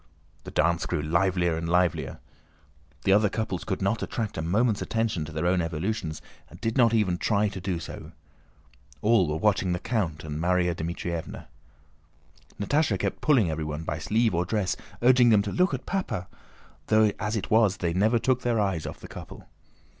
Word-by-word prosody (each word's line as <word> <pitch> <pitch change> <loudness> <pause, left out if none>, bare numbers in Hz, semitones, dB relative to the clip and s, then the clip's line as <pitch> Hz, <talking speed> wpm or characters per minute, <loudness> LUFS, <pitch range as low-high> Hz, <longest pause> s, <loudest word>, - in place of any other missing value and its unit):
The - - -6
dance 85 +2 +1
grew 80 -4 -1
livelier 85 +1 +1
and 85 +1 -3
livelier. 90 -2 +1 0.9
The 95 - +4
other 105 +1 +4
couples 110 -5 -3
could 95 -2 -3
not 100 +4 0
attract 110 -3 -3
a - - -2
moment's 105 +6 +1
attention 110 -8 -1
to 80 - -9
their 80 +2 -2
own 90 0 +2
evolutions 80 +1 -3 0.3
and - - -13
did 115 0 -2
not 120 -4 +5
even 100 -6 +1
try 105 -1 +2
to 95 - -7
do 90 -2 -2
so. 80 - -8 0.9
All 105 -5 +4
were 75 - -1
watching 95 -1 +1
the 90 - -2
count 90 -10 -2
and 75 0 -5
Márya 90 0 +2
Dmítrievna. 85 0 -5 1.1
Natásha 110 +1 +1
kept 95 +1 -3
pulling 120 - +3
everyone 75 0 -4
by - - -3
sleeve 110 -1 +1
or 85 +1 +1
dress, 95 0 -1 0.3
urging 125 -1 +6
them 105 -3 +5
to 100 - -4
"look 180 +1 +2
at 130 -2 -4
Papa!" 115 - -3 0.6
though 110 -1 +4
as 105 +1 -2
it 105 0 -4
was 110 -3 +4
they 85 -3 -1
never 110 +6 +3
took 125 +2 +1
their 120 -3 +1
eyes 95 -6 -1
off - - -8
the - - -9
couple. - - -10
95 Hz, 185 wpm, -26 LUFS, 85-110 Hz, 1.1 s, urging